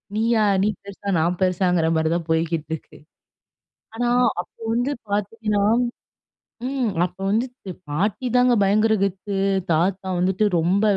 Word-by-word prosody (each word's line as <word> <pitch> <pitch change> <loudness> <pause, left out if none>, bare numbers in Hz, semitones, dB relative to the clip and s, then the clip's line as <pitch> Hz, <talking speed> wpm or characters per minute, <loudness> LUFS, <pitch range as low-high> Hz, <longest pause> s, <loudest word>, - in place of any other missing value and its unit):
நீயா! 225 0 +2 0.2
நீ - - +3 0.2
பெருசா! 200 0 -7
நான் 170 +2 +1
பெருசாங்கிறமாரி 175 -3 +2
தான் 170 -1 -3
போய்க்கிட்டு 160 -1 0
இருக்கு. 160 - -8 1.0
ஆனா, 240 +1 -1 0.3
அப்ப - - -11 0.2
வந்து 245 +4 0 0.2
பார்த்தீங்ன்னா, 210 0 -1 1.1
ம். 265 -3 -1 0.2
அப்போ 180 +1 -9
வந்துட்டு, 235 -3 -2 0.2
பாட்டிதாங்க 245 - +1
பயங்கர 215 +3 +3
கெத்து. 195 +1 -3 0.4
தாத்தா 185 +4 +1
வந்துட்டு 190 +3 +1
ரொம்ப 185 +5 +2
195 Hz, 115 wpm, -22 LUFS, 175-225 Hz, 1.1 s, நீ